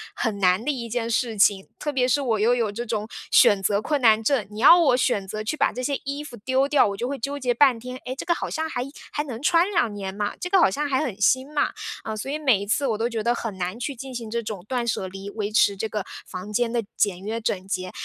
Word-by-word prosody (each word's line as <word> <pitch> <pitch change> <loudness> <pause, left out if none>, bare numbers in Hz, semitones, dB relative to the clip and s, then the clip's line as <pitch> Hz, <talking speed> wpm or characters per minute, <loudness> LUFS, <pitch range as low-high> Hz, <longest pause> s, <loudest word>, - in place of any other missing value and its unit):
很 220 -4 -1
难 185 +2 +3
的 295 - -2
一 240 -4 -5
件 230 0 -2
事 230 -1 0
情， 195 -1 +3
特 295 - -2
别 255 -3 +1
是 270 +3 +2
我 225 -5 0
又 235 +3 +4
有 230 -4 0
这 235 +4 -5
种 215 -1 -3 0.2
选 200 -2 +6
择 205 +1 +2
困 295 +2 0
难 220 -2 +5
症， 245 -3 +1
你 210 - -8
要 335 +8 +8
我 270 -7 +4
选 200 -5 0
择 215 +2 -4
去 305 +8 -3
把 - - +2
这 255 - -4
些 280 +2 -1
衣 280 +2 -3
服 240 -5 -10
丢 260 +5 +1
掉， 285 -6 +4
我 200 - -5
就 245 - -2
会 280 0 -3
纠 280 +4 -4
结 250 -2 +1
半 255 -3 +4
天。 250 +2 -7
哎， 255 - -3
这 - - -5
个 345 - +3
好 - - -4
像 320 0 -2
还 245 -5 -2 0.3
还 295 - -2
能 245 -5 -7
穿 335 +5 +3
2 235 - +1
年 195 -2 -5
嘛， 205 +1 -2
这 360 - -4
个 385 -1 +4
好 - - +5
像 290 +10 -2
还 270 +2 +1
很 215 -7 -5
新 260 +7 +2
嘛， 290 - +2 0.3
嗯， 220 - -4
所 265 - -5
以 300 - -1
每 260 -10 +3
一 200 - -5
次 275 +6 +1
我 220 - 0
都 230 +2 0
觉 225 -2 -3
得 235 - +2
很 230 -5 -5
难 185 +6 -3
去 275 +2 -3
进 265 +2 -8
行 230 -3 -6
这 235 +1 -2
种 205 -4 -6
断 245 -2 -1
舍 190 -4 -1
离， 195 +2 -8
维 210 -1 -3
持 205 -1 +4
这 220 - -2
个 210 -2 -3 0.2
房 185 +3 -7
间 235 +1 +1
的 235 -1 0
简 190 -3 +1
约 220 +3 -3
整 190 -4 -2
洁， 185 -2 -3
235 Hz, 300 characters per minute, -24 LUFS, 210-270 Hz, 0.3 s, 要